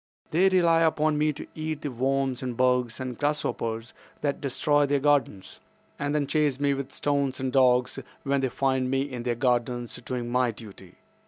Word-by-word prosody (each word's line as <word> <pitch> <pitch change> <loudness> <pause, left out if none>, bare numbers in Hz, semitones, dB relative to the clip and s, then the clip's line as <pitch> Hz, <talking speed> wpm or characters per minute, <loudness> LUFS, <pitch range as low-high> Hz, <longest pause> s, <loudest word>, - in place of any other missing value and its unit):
They 185 +5 +4
rely 170 -3 +4
upon 155 -2 +2
me 155 0 +3
to - - -8
eat 155 -1 -4
the 145 - -3
worms 130 +1 0
and 125 -3 -4
bugs 125 -2 +1
and 130 -1 -4
grasshoppers 120 -5 -2 0.3
that 145 -1 -1
destroy 145 +1 +2
their 140 0 +2
gardens, 135 -9 0 0.4
and 145 +1 -1
then 145 -1 +1
chase 145 -2 +1
me 145 -1 +2
with 140 0 -5
stones 140 -2 -1
and 130 -1 -2
dogs 125 -2 +3 0.2
when 140 0 +1
they 130 - 0
find 130 0 0
me 135 0 +1
in 130 -4 -6
their 120 0 -1
gardens 120 -1 0
doing 125 -1 -4
my 125 0 +2
duty. 100 -5 -11
135 Hz, 180 wpm, -26 LUFS, 125-145 Hz, 0.4 s, They